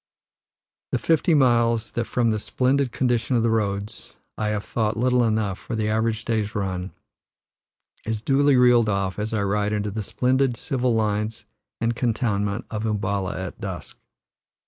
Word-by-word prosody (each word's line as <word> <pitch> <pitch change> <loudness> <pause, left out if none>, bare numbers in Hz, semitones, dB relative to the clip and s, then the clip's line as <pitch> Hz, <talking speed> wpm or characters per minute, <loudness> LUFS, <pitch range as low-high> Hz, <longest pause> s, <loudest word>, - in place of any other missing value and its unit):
The - - +2
fifty 165 0 +2
miles, 115 -4 +3
that 120 - -2
from 115 +1 +1
the 110 - -1
splendid 130 +3 0
condition 120 0 0
of 115 - +2
the 115 - +2
roads 105 -2 -2 0.2
I 110 - -2
have 105 -1 -1
thought 110 -1 -1
little 125 +1 +3
enough 110 -4 0
for 120 - -5
the 110 -1 0
average 110 0 0
day's 110 -2 -1
run, 95 -2 -2 1.2
is 110 -1 -2
duly 140 +1 +4
reeled 120 -3 +5
off 95 -1 -1
as 105 +2 -2
I 110 -2 0
ride 105 +1 0
into 105 -1 -1
the 110 +2 -3
splendid 130 +3 +1
civil 125 -1 0
lines 110 +1 -1 0.3
and 115 +1 0
cantonment 105 -3 -1
of 110 0 -2
Um 105 -1 0
balla 100 -2 -2
at 95 -1 -7
dusk. - - -6
110 Hz, 165 wpm, -24 LUFS, 105-120 Hz, 1.2 s, reeled